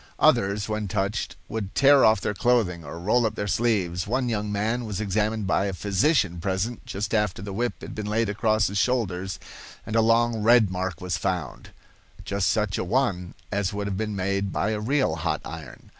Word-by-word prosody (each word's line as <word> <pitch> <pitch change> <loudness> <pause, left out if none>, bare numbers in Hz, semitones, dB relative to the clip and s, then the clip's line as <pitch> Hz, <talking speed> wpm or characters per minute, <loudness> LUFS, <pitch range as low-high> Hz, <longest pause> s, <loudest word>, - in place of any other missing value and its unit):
Others, 100 +1 +3
when 110 -1 -2
touched, 100 +1 -2
would 105 -3 -5
tear 140 0 +6
off 110 0 +5
their - - -1
clothing 95 -5 +1
or 75 +3 -8
roll 110 +7 +2
up 110 -1 0
their 100 - -2
sleeves. 100 -5 0
One 125 +2 0
young 105 -2 -2
man 110 +4 -1
was 105 -3 -4
examined 110 +1 0
by 95 0 +1
a 100 - -2
physician 100 - +1
present 95 +6 -2
just 105 +3 -3
after 105 -4 +1
the 100 -1 -6
whip 120 +4 -2
had - - -8
been 105 -1 -5
laid 110 +2 +1
across 110 +1 +1
his 100 +1 -1
shoulders, 95 -8 -1 0.5
and 110 - -4
a 115 - +5
long 115 0 +2
red 110 -2 +5
mark 90 -2 -3
was 90 -3 -2
found, 90 -4 -3 0.6
just 100 0 0
such 105 -3 0
a - - 0
one 95 -4 -1 0.2
as 100 -1 -1
would 100 0 -3
have 100 -2 -3
been 105 -1 -2
made 100 +1 -1
by 105 - 0
a 105 - -1
real 135 +6 +1
hot - - -1
iron. 75 -7 -9
105 Hz, 200 wpm, -25 LUFS, 95-110 Hz, 0.6 s, tear